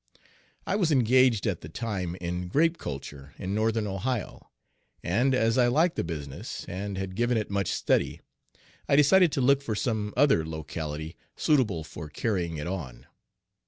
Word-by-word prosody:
I 200 - 0
was 175 -6 +2
engaged 125 -3 +4
at 100 -6 -1
the 75 - -9
time 95 -3 -3
in 90 0 -4
Page - - -7
2 - - -10
grape 165 - +2
culture 70 0 -7
in 95 0 -4
northern 110 +1 +1
Ohio, 105 +3 -3 0.5
and, 125 +9 +2
as 115 0 +2
I 120 - +5
liked 160 +7 +2
the - - -1
business 75 -5 -6
and 100 +2 -4
had 95 -1 -4
given 120 +4 +1
it 105 -2 -3
much 100 -2 0
study, - - 0 0.7
I - - +5
decided 160 +4 +6
to 135 - 0
look 140 +2 +4
for 115 -6 -3
some 105 -1 -1
other 135 - +4
locality 80 0 -5 0.2
suitable 110 - +2
for 75 -1 -9
carrying 85 -3 -2
it 75 - -4
on. 70 -9 -5
105 Hz, 170 wpm, -27 LUFS, 85-125 Hz, 0.7 s, decided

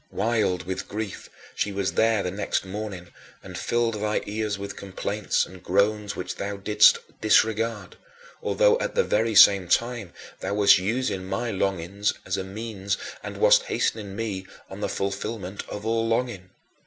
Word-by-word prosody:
Wild 110 -6 0
with 95 +3 -4
grief, 105 -2 -5 0.3
she 105 - -1
was 100 -1 -1
there 110 -2 +2
the 90 - -2
next 100 0 -2
morning 95 -2 -6 0.3
and - - -9
filled 115 -3 0
thy 105 0 0
ears 105 -1 -2
with 100 0 -6
complaints 100 +1 -1
and 95 -1 -13
groans 100 +3 +1
which - - -5
thou 100 0 -4
didst 105 +2 +5 0.2
disregard, 110 0 +2 0.4
although, - - +3
at - - -3
the 480 - +4
very 115 - +1
same 100 -1 +7
time, 115 -2 0 0.3
thou 100 - -3
wast 100 -2 +6
using 100 -1 -1
my 95 +5 -2
longings 95 +1 -1
as 95 - -1
a 95 - -3
means 100 0 -4 0.2
and - - -7
wast - - +5
hastening 110 - -2
me 100 -4 -4 0.2
on 95 - -7
to - - -9
the - - -1
fulfillment 100 0 -3
of 105 - -6
all 115 0 +1
longing. 115 -5 -1
105 Hz, 165 wpm, -25 LUFS, 95-115 Hz, 0.4 s, same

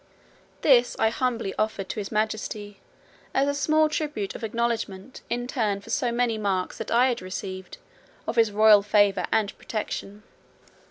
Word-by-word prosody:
This 250 -4 +5
I 220 - +3
humbly 230 -5 -1
offered 215 -3 -1
to - - -3
his 205 - -5
majesty, 215 -1 -2 0.6
as 275 +1 +3
a 285 - +1
small 310 +2 +3
tribute 295 -10 -3
of - - -9
acknowledgment, 230 -1 -3
in 245 +1 -1
turn 220 -6 -1
for 200 - -10
so 250 -4 +1
many 235 -2 0
marks 190 -3 -1
that 225 - -5
I 245 +3 +4
had 240 - -2
received, 185 0 -6 0.5
of 225 - -3
his 225 -2 +4
royal 210 0 +6
favour 200 -2 +3
and 210 -2 +1
protection. 210 -1 -5
220 Hz, 160 wpm, -26 LUFS, 205-245 Hz, 0.6 s, royal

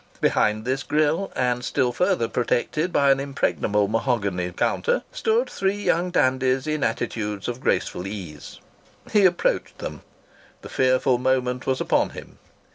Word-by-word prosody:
Behind 110 +1 +1
this 130 +2 -1
grille, 155 +6 0
and 125 -1 0
still 125 0 +1
further 180 -4 +1
protected 150 +9 -1
by 140 -3 +4
an 135 - +3
impregnable 110 -7 0
mahogany 105 -6 -1
counter, 485 - 0
stood 485 -1 +1
three 195 +1 -1
young 180 -3 0
dandies 130 -4 +1
in 155 -1 -1
attitudes 110 -3 -2
of 120 +1 -4
graceful 90 - -1
ease. 80 -9 -8 0.5
He 205 -2 +5
approached 175 -1 +1
them. - - -6 0.6
The - - -9
fearful 130 -1 +2
moment 125 -1 0
was 130 0 +1
upon - - +1
him. - - -11
130 Hz, 140 wpm, -24 LUFS, 115-155 Hz, 0.6 s, He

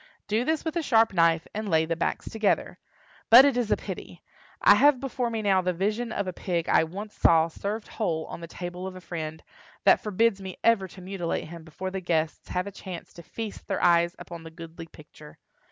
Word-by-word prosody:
Do 215 +3 +1
this 315 +4 -1
with 320 - -2
a 340 - +1
sharp 225 -7 +3
knife, 165 -2 +3
and 215 0 -4
lay 160 -2 +3
the 165 +1 -1
backs 165 - -2
together. 220 -3 0 0.5
But 245 +4 +10
it 280 -3 +3
is 245 -3 0
a - - +4
pity! - - -8 0.4
I - - +7
have 285 -2 +5
before 255 -2 -2
me 225 -2 -3
now 195 -2 +3
the 180 0 0
vision 215 +6 -1
of 200 - -2
a 185 - -4
pig 170 -2 -2
I - - +4
once 200 +6 -8
saw 165 0 +4
served 205 +6 -5
whole 165 -8 -2
on - - -8
the 170 - -7
table 180 +2 -6
of 190 - -8
a - - -8
friend, 160 -3 -6 0.4
that - - +5
forbids 210 0 +1
me 190 -1 -7
ever 225 -5 +3
to 185 +1 -13
mutilate 180 -4 -3
him 170 -1 -9
before 185 +4 -6
the 190 0 -4
guests 160 -3 -1
have 180 0 -1
a 200 - -6
chance 185 -3 -9
to 170 - -11
feast 215 +5 -7
their - - -2
eyes 170 +1 +4
upon 170 -1 -9
the 165 - -10
goodly 165 0 -10
picture. 150 -1 -15
185 Hz, 220 wpm, -27 LUFS, 170-220 Hz, 0.5 s, But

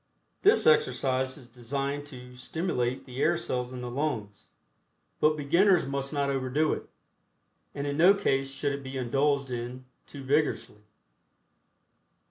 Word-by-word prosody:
This 415 +4 +5
exercise 130 - +2
is 135 - -13
designed 140 +4 -4
to 125 -3 -11
stimulate 130 -3 -2
the 130 +1 -6
air 170 +2 +3
cells 125 -6 -3
in 125 -1 -6
the 125 - -5
lungs, 120 -8 -3 0.7
but 155 0 +3
beginners 170 +5 +3
must 135 0 -3
not 140 -2 0
overdo 135 +3 +1
it, - - -7 0.9
and 140 - -3
in 145 0 -2
no 180 +5 +7
case 135 -9 0
should 140 +1 -2
it 140 - -5
be 135 0 -6
indulged 135 +2 0
in 125 +1 -5 0.2
too 140 - -9
vigorously. 140 -6 0
135 Hz, 140 wpm, -28 LUFS, 125-150 Hz, 0.9 s, no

